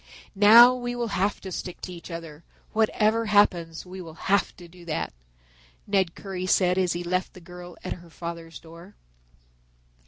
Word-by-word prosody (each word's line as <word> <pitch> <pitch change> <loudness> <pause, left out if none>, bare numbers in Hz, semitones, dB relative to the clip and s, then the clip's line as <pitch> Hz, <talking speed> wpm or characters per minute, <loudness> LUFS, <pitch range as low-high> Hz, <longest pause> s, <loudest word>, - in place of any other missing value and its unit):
"Now 225 +5 +8
we 245 -1 -4
will 240 -1 -2
have 200 +1 0
to 190 - -7
stick 180 0 -6
to 180 - -7
each 170 +1 -11
other, 165 -2 -8 0.3
whatever 220 +1 +2
happens 175 -6 +2
we 185 +1 -9
will 165 -3 -10
have 195 +4 0
to 175 - -12
do 175 +1 -16
that," 155 - -3 0.7
Ned 190 -4 0
Currie 185 -2 -5
said 180 0 +3
as 180 -2 +1
he 175 +1 -4
left 185 +1 -2
the - - -10
girl 175 0 -11
at 185 - -3
her 175 -1 -14
father's 165 0 -8
door. 170 +4 -14
180 Hz, 175 wpm, -25 LUFS, 170-205 Hz, 0.7 s, Now